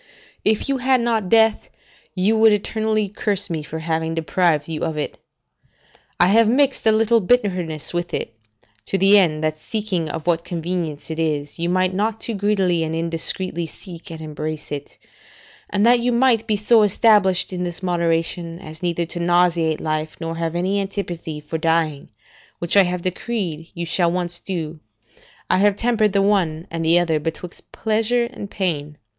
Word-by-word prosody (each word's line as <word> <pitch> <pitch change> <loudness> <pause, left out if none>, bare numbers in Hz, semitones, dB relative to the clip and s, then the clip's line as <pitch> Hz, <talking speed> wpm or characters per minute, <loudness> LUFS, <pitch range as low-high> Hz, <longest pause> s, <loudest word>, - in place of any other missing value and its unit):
If 215 0 +2
you 275 -1 0
had 260 0 +3
not 225 -5 0
death, 225 0 +3 0.5
you 200 +4 +2
would 220 0 +6
eternally 215 +1 0
curse 200 -1 -2
me 160 -2 -2
for 150 +2 -7
having 160 0 -2
deprived 165 -1 +1
you 160 -2 -4
of 160 -1 -2
it; 150 - -4 1.0
I 175 - +5
have 225 +2 +5
mixed 270 -1 +2
a - - +7
little 225 +1 +3
bitterness 180 -9 0
with 175 0 -2
it, - - -3 0.5
to 195 - 0
the 195 +2 +6
end, 155 -5 +1
that 155 0 -1
seeing 190 -4 -2
of 160 +1 -5
what 170 -1 +1
convenience 170 -3 -4
it 160 - -4
is, 150 -1 -2
you 170 +1 0
might 185 +1 +1
not 215 +3 -1
too 230 - -4
greedily 195 -4 +1
and 160 0 -3
indiscreetly 165 +1 -2
seek 175 +1 -11
and 160 -1 -8
embrace 155 0 -6
it: 145 -1 -6 0.7
and 205 +1 +1
that 240 +1 +6
you 245 +1 0
might 235 -2 +3
be 215 - +2
so 215 +2 +4
established 205 -3 +3
in 180 0 -3
this 175 +1 -4
moderation, 170 -1 -1
as 160 -3 -11
neither 175 -1 -1
to 175 - -6
nauseate 170 -2 +2
life, 155 0 -3
nor 165 0 -4
have 165 0 -2
any 190 +3 0
antipathy 175 -6 -5
for 150 +2 -5
dying, 160 -3 0 0.5
which 170 +2 -2
I 200 -2 +7
have 180 0 -3
decreed 180 -4 -3
you 170 0 -3
shall 170 0 +1
once 175 -1 -2
do, 165 -4 -5 0.7
I 185 - +2
have 205 0 +4
tempered 220 -2 +1
the 200 -1 +3
one 175 -6 +1
and 165 0 -3
the 165 +2 +4
other 165 -3 +1
betwixt 165 +3 -7
pleasure 225 +2 +1
and 205 -4 -7
pain. 150 -7 -3
175 Hz, 175 wpm, -21 LUFS, 165-210 Hz, 1.0 s, a